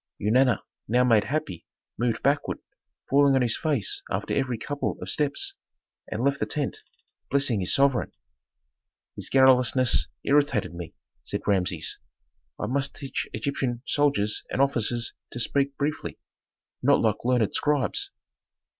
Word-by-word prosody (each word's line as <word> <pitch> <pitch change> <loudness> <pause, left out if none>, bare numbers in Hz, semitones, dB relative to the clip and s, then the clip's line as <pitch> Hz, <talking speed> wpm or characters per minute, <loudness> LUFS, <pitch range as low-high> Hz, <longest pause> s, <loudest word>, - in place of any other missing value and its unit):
Eunana, 125 +5 +3 0.2
now 125 +2 +3
made 115 -5 +4
happy, 150 - -3 0.3
moved 120 -1 -1
backward, 140 +2 +1 0.5
falling 140 0 +4
on 130 - +3
his 115 -2 +2
face 145 - 0
after - - -2
every 130 -3 0
couple 145 +5 -3
of - - -4
steps, 145 -2 0 0.6
and 110 +3 -2
left 140 0 +1
the - - -1
tent, 145 -3 -2 0.5
blessing 135 -5 +2
his 90 - 0
sovereign. 135 -2 +2 1.0
"His - - -6
garrulousness 130 -1 +4 0.2
irritated 140 - +2
me," 85 -1 -8 0.3
said - - -3
Rameses. 90 -5 0 0.6
"I - - -2
must 135 +4 -1
teach 135 -3 -4
Egyptian 120 0 -2
soldiers 140 -9 +1
and - - -3
officers 120 -3 +1 0.2
to 120 - -5
speak 140 +3 0
briefly, 145 +1 -3 0.6
not - - +4
like 110 -2 +2
learned 120 -3 +2
scribes." 145 -8 +1
130 Hz, 135 wpm, -26 LUFS, 115-140 Hz, 1.0 s, made